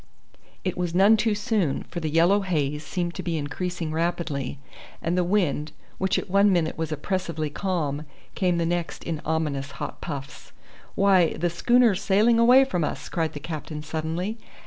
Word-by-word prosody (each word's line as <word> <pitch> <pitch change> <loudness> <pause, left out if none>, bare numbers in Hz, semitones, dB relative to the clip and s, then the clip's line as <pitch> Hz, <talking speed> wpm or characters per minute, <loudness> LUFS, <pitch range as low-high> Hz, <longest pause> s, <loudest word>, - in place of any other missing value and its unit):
It 185 - -1
was 175 -1 -2
none 200 +4 +6
too 215 -1 +1
soon, 205 - 0
for 175 - -6
the 160 -2 -2
yellow 170 +6 +4
haze 150 -5 -1
seemed 175 +1 -3
to 185 - -5
be 170 -3 -2
increasing 165 +3 -3
rapidly, 160 -5 -2 0.4
and 170 +1 -1
the 180 - +2
wind, 170 -6 0 0.3
which 190 0 +1
at - - -3
one 200 +2 +4
minute 170 -4 +1
was 160 -1 -3
oppressively 160 -1 -2
calm, 155 -5 -2 0.3
came 180 -2 +1
the 170 - +1
next 175 0 -2
in 160 -3 -3
ominous 150 -3 -1
hot - - -6
puffs. 140 -4 -7 0.4
"Why, 190 -4 +4
the 175 0 -1
schooner's 230 +2 +3
sailing 215 +4 +4
away 250 +3 +7
from 180 -11 -1
us," - - -4
cried 165 -2 -1
the 145 - -6
captain 155 -1 -6
suddenly. 165 +8 -3
170 Hz, 170 wpm, -25 LUFS, 155-190 Hz, 0.4 s, away